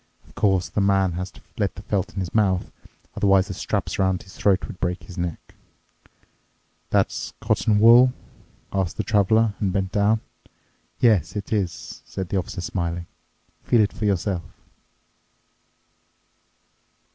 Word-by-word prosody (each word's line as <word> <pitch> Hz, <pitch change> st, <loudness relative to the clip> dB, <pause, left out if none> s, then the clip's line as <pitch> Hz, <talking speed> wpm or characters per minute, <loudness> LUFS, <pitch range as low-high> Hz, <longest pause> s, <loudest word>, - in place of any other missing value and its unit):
Of -, -, -20 dB
course, 95 Hz, -3 st, +2 dB
the 105 Hz, -, -1 dB
man 95 Hz, -1 st, +3 dB
has 90 Hz, +2 st, -4 dB
to -, -, -18 dB, 0.2 s
let 100 Hz, -3 st, 0 dB
the 100 Hz, -, -10 dB
felt 100 Hz, -2 st, -2 dB
in 95 Hz, -, -2 dB
his 90 Hz, -, -5 dB
mouth—otherwise 95 Hz, 0 st, 0 dB
the -, -, -3 dB
straps -, -, -2 dB
around 95 Hz, -1 st, +1 dB
his 95 Hz, -, -15 dB
throat 100 Hz, -2 st, +2 dB
would 90 Hz, -, -10 dB
break 90 Hz, -1 st, -2 dB
his 85 Hz, +3 st, -11 dB
neck." 85 Hz, -3 st, -5 dB, 1.4 s
"That's -, -, 0 dB
cotton 105 Hz, -2 st, +1 dB
wool?" 120 Hz, +4 st, +7 dB, 0.6 s
asked 95 Hz, -3 st, -1 dB
the -, -, -1 dB
Traveler 110 Hz, +1 st, +3 dB
and 100 Hz, -3 st, 0 dB
bent 95 Hz, 0 st, -1 dB
down. 105 Hz, +2 st, +2 dB, 0.8 s
"Yes, 105 Hz, -9 st, +3 dB
it 105 Hz, +1 st, -4 dB
is," 90 Hz, -7 st, -3 dB
said 95 Hz, -2 st, -6 dB
the 100 Hz, -, 0 dB
Officer 90 Hz, 0 st, -3 dB
smiling, 85 Hz, -1 st, -3 dB, 0.6 s
"feel 120 Hz, -, +3 dB
it 105 Hz, -, +1 dB
for 110 Hz, -, -3 dB
yourself." 95 Hz, -2 st, 0 dB
95 Hz, 145 wpm, -23 LUFS, 90-105 Hz, 1.4 s, wool